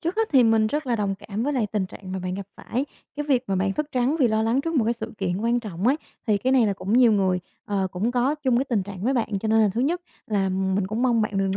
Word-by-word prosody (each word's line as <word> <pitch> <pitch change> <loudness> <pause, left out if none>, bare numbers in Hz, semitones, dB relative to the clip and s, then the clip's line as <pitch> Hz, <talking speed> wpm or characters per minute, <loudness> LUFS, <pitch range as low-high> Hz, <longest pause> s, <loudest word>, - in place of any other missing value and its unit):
trước 340 +4 -2
hết 445 0 +1
thì 260 - +7
mình 225 -1 +4
rất 295 +6 -2
là 240 -2 +1
đồng 200 -2 -1
cảm 205 +2 -5
với 290 +4 0
lại 250 -6 +1
tình 205 -3 0
trạng 185 0 -10
mà 190 - -2
bạn 185 0 -3
gặp 195 0 -6
phải. 255 +4 -2 0.3
Cái 295 - -2
việc 255 -3 +3
mà 195 - -1
bạn 195 +1 +1
thức 300 +7 -2
trắng 255 +4 +1
vì 245 - +5
lo 220 0 +1
lắng 230 +4 +2
trước 330 +3 -3
một 255 -7 +3
cái 230 - +2
sự 225 -1 -6
kiện 180 -2 -1
quan 235 +2 +1
trọng 200 -2 -4
ấy, 270 +4 +4 0.3
thì 210 -3 +3
cái 255 +6 +1
này 255 -4 +5
là 205 - +1
cũng 195 +1 -4
nhiều 240 -1 +6
người, 190 -3 +2 0.3
ờ, 195 -2 0
cũng 200 +7 -1
có 255 +4 +2
chung 270 -5 +1
cái 265 - +1
tình 235 -7 0
trạng 190 -1 -8
với 265 +3 +2
bạn, 225 -4 0
cho 220 - -2
nên 220 +1 +4
là 215 -2 +4
thứ 235 - 0
nhất 330 +7 +1 0.3
là 200 -3 +1
mình 190 +1 0
cũng 215 +5 -2
mong 240 -3 +3
bạn 205 -2 -1
đừng 195 0 0
220 Hz, 310 wpm, -24 LUFS, 195-255 Hz, 0.3 s, thì